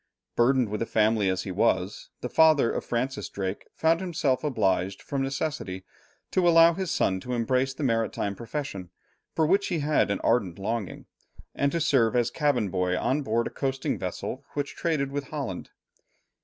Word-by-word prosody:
Burdened 125 Hz, -1 st, +3 dB
with 105 Hz, +1 st, -3 dB
a 115 Hz, -, -1 dB
family 110 Hz, -2 st, +2 dB
as 95 Hz, 0 st, -1 dB
he 95 Hz, -, -5 dB
was, 95 Hz, -1 st, 0 dB
the -, -, -2 dB
father 155 Hz, -3 st, +4 dB
of -, -, -3 dB
Francis 120 Hz, -3 st, -2 dB
Drake 95 Hz, 0 st, -4 dB
found 165 Hz, +1 st, +2 dB
himself 155 Hz, -8 st, 0 dB
obliged 95 Hz, -9 st, 0 dB
from 140 Hz, -1 st, -3 dB
necessity 135 Hz, -9 st, -3 dB, 0.5 s
to 180 Hz, -2 st, +3 dB
allow 165 Hz, 0 st, +7 dB
his 185 Hz, +1 st, -3 dB
son 95 Hz, -9 st, +1 dB
to 125 Hz, +6 st, -5 dB
embrace 130 Hz, +3 st, 0 dB
the 150 Hz, -, -5 dB
maritime 115 Hz, -4 st, 0 dB
profession, 115 Hz, -, -5 dB, 0.5 s
for 160 Hz, -, +3 dB
which 195 Hz, +5 st, +2 dB
he 175 Hz, -, -1 dB
had 150 Hz, -5 st, +2 dB
an 100 Hz, -, 0 dB
ardent 105 Hz, -8 st, +1 dB
longing, 100 Hz, 0 st, -4 dB, 0.5 s
and 140 Hz, 0 st, +1 dB
to 170 Hz, -, 0 dB
serve 125 Hz, -7 st, +3 dB
as 120 Hz, -1 st, +2 dB
cabin 145 Hz, -9 st, +1 dB
boy 90 Hz, -1 st, 0 dB
on 140 Hz, +9 st, 0 dB
board 115 Hz, -3 st, 0 dB
a -, -, -4 dB
coasting 135 Hz, -1 st, -2 dB
vessel 95 Hz, +8 st, -4 dB
which 145 Hz, -1 st, -3 dB
traded 150 Hz, -5 st, -1 dB
with 140 Hz, 0 st, -3 dB
Holland. 135 Hz, -, -5 dB
125 Hz, 175 wpm, -27 LUFS, 100-145 Hz, 0.5 s, allow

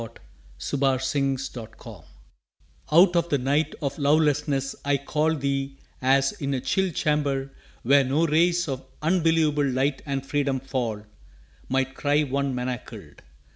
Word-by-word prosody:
TO 145 Hz, -, -3 dB
HER 135 Hz, -1 st, +3 dB
WHO 135 Hz, +1 st, 0 dB
SHALL 125 Hz, -4 st, -6 dB
COME -, -, -10 dB
1 -, -, -16 dB, 1.0 s
Out 180 Hz, -1 st, +4 dB
of 170 Hz, 0 st, +1 dB
the 145 Hz, -, +2 dB
night 145 Hz, +4 st, 0 dB
of 140 Hz, +2 st, -3 dB
lovelessness 145 Hz, -2 st, +1 dB
I 145 Hz, 0 st, +2 dB
call 150 Hz, +3 st, 0 dB
Thee, 135 Hz, -1 st, -2 dB, 0.2 s
as, 135 Hz, +1 st, +3 dB
in 140 Hz, -1 st, -3 dB
a -, -, -1 dB
chill 185 Hz, +9 st, 0 dB
chamber 140 Hz, -4 st, -1 dB, 0.3 s
where 140 Hz, +3 st, +5 dB
no 140 Hz, +6 st, +1 dB
rays 170 Hz, +2 st, +2 dB
Of 135 Hz, -2 st, -4 dB, 0.2 s
unbelievable 160 Hz, -4 st, +2 dB
light 135 Hz, +2 st, 0 dB
and 135 Hz, -1 st, -2 dB
freedom 140 Hz, -1 st, 0 dB
fall, 125 Hz, -5 st, -3 dB, 0.7 s
Might 135 Hz, 0 st, 0 dB
cry 145 Hz, +2 st, +1 dB
one 140 Hz, -1 st, -1 dB
manacled! 125 Hz, -1 st, -6 dB
140 Hz, 145 wpm, -25 LUFS, 135-150 Hz, 1.0 s, where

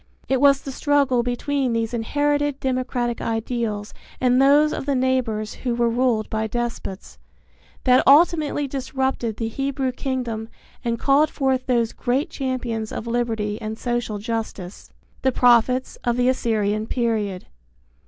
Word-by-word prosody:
It 265 Hz, -1 st, +1 dB
was 280 Hz, -1 st, +6 dB
the 275 Hz, -, -5 dB
struggle 275 Hz, -3 st, +2 dB
between 250 Hz, +1 st, -1 dB
these 230 Hz, 0 st, -1 dB
inherited 290 Hz, +4 st, 0 dB
democratic 255 Hz, -3 st, -1 dB
ideals 225 Hz, -2 st, -2 dB, 0.3 s
and 250 Hz, 0 st, +3 dB
those 290 Hz, +3 st, +5 dB
of 270 Hz, -, -5 dB
the 280 Hz, -, +1 dB
neighbors 250 Hz, -5 st, 0 dB
who 245 Hz, -2 st, -1 dB
were 235 Hz, -1 st, +1 dB
ruled 235 Hz, -2 st, +1 dB
by 220 Hz, 0 st, -2 dB
despots, 235 Hz, -4 st, -5 dB, 0.6 s
that 255 Hz, -1 st, +5 dB
ultimately 295 Hz, -1 st, +4 dB
disrupted 265 Hz, -4 st, -2 dB
the 225 Hz, -, -2 dB
Hebrew 270 Hz, +2 st, -2 dB
kingdom 245 Hz, -4 st, -3 dB, 0.3 s
and 235 Hz, -1 st, -1 dB
called 285 Hz, +5 st, +3 dB
forth 265 Hz, -3 st, -1 dB
those 235 Hz, -3 st, +1 dB
great 260 Hz, +4 st, -1 dB
champions 245 Hz, -5 st, -3 dB
of -, -, -5 dB
liberty 225 Hz, -3 st, -2 dB
and 220 Hz, 0 st, -4 dB
social 240 Hz, -3 st, -2 dB
justice, 210 Hz, -4 st, -5 dB, 0.3 s
the 260 Hz, -, +2 dB
prophets 245 Hz, +1 st, +3 dB
of 240 Hz, 0 st, 0 dB
the 250 Hz, +1 st, +3 dB
Assyrian 215 Hz, -4 st, 0 dB
period. 220 Hz, -7 st, -1 dB
245 Hz, 140 wpm, -22 LUFS, 225-265 Hz, 0.6 s, was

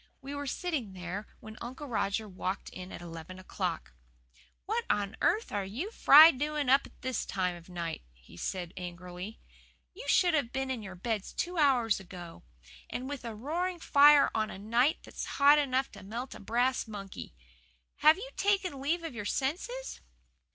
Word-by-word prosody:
We 275 Hz, +2 st, -7 dB
were 285 Hz, 0 st, -4 dB
sitting 275 Hz, -, -2 dB
there 185 Hz, +3 st, -5 dB
when 220 Hz, 0 st, -10 dB
Uncle 260 Hz, +5 st, -6 dB
Roger 220 Hz, -4 st, -1 dB
walked 185 Hz, 0 st, -4 dB
in 185 Hz, 0 st, -8 dB
at -, -, -8 dB
eleven 165 Hz, +1 st, -8 dB
o'clock. 70 Hz, -, -4 dB, 0.7 s
"What 455 Hz, +4 st, -1 dB
on 205 Hz, 0 st, 0 dB
earth 440 Hz, +2 st, +2 dB
are 205 Hz, -1 st, -1 dB
you 200 Hz, +8 st, -5 dB
young 420 Hz, -, -6 dB
fry 315 Hz, -6 st, +9 dB
doing 295 Hz, 0 st, -2 dB
up 275 Hz, +2 st, +5 dB
at -, -, -24 dB
this 260 Hz, 0 st, -1 dB
time 180 Hz, -2 st, -1 dB
of 170 Hz, +1 st, -13 dB
night?" 170 Hz, -2 st, -4 dB
he -, -, -20 dB
asked 175 Hz, -, -4 dB
angrily. 180 Hz, +3 st, -7 dB, 0.5 s
"You 445 Hz, +7 st, -9 dB
should 355 Hz, -2 st, +4 dB
have 280 Hz, -7 st, +1 dB
been 265 Hz, 0 st, -2 dB
in 250 Hz, -4 st, -3 dB
your 190 Hz, -3 st, -8 dB
beds 210 Hz, +2 st, -3 dB
two 355 Hz, -1 st, -2 dB
hours 250 Hz, -8 st, +3 dB
ago. 175 Hz, -2 st, -10 dB, 0.5 s
And 255 Hz, +1 st, -4 dB
with 285 Hz, -2 st, -5 dB
a 230 Hz, -2 st, -5 dB
roaring 345 Hz, +10 st, -2 dB
fire 290 Hz, -1 st, +6 dB
on 215 Hz, -1 st, 0 dB
a -, -, -7 dB
night 235 Hz, +9 st, +2 dB
that's -, -, -6 dB
hot 290 Hz, +1 st, +7 dB
enough 270 Hz, -2 st, 0 dB
to 200 Hz, -, -12 dB
melt 235 Hz, +6 st, -6 dB
a -, -, -10 dB
brass 245 Hz, +4 st, 0 dB
monkey! 200 Hz, -, -8 dB, 0.6 s
Have 310 Hz, +2 st, +6 dB
you -, -, -7 dB
taken 385 Hz, -8 st, 0 dB
leave 330 Hz, +5 st, 0 dB
of 325 Hz, -, -5 dB
your 210 Hz, -3 st, -5 dB
senses?" 370 Hz, -, -3 dB
240 Hz, 180 wpm, -31 LUFS, 190-290 Hz, 0.7 s, fry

